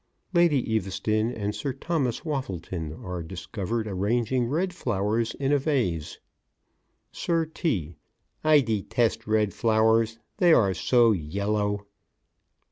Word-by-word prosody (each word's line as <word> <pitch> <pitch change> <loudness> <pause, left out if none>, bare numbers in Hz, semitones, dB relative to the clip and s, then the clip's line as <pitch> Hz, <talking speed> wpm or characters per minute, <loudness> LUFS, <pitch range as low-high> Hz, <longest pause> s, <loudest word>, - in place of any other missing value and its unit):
_ - - -8
LADY 170 -6 +4
EAVESTON 110 +2 0
and 105 -1 -3
SIR 140 +3 -3
THOMAS 135 -3 -2
WAFFLETON 95 - -4
are 90 -1 -4
discovered, 95 +6 -4
arranging 115 +5 0
red 175 +8 -1
flowers 115 - -1
in 135 0 -1
a 145 - +4
vase. 120 - -1 0.9
SIR 165 -1 0
T.: 90 - -2 0.5
I 155 -1 +6
detest 110 0 0
red 105 -3 +2
flowers; 115 0 +2 0.2
they 175 -5 +5
are 100 -8 +4
so 120 +3 +4
yellow. 100 +4 -1
110 Hz, 120 wpm, -26 LUFS, 100-135 Hz, 0.9 s, I